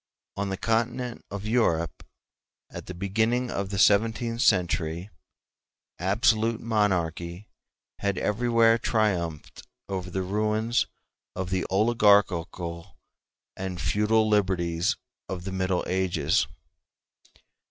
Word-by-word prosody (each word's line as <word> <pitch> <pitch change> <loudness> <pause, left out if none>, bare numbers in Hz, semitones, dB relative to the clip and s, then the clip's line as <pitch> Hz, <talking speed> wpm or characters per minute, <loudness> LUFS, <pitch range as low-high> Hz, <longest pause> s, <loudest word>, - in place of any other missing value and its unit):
On 100 0 -2
the 95 - -3
Continent 120 +3 -1
of 100 0 -6
Europe, 85 - +1 0.7
at - - -8
the 90 - -6
beginning 110 +7 0
of 100 -1 -3
the 100 - -3
seventeenth 115 +4 +3
century, 90 -3 +1 0.9
absolute 110 +4 +2
monarchy 90 -4 -1 0.5
had 100 -2 -1
everywhere 115 +2 +3
triumphed 90 -10 -1 0.3
over 95 -2 -4
the 95 +1 -2
ruins 110 +4 0 0.5
of 95 0 -4
the 95 -1 0
oligarchical 95 -5 +2 0.6
and 95 -2 -5
feudal 110 +4 +2
liberties 90 -5 +1 0.3
of 90 -1 -4
the 95 - -5
Middle 95 -1 0
Ages. 85 -8 +1
100 Hz, 100 wpm, -26 LUFS, 90-110 Hz, 0.9 s, seventeenth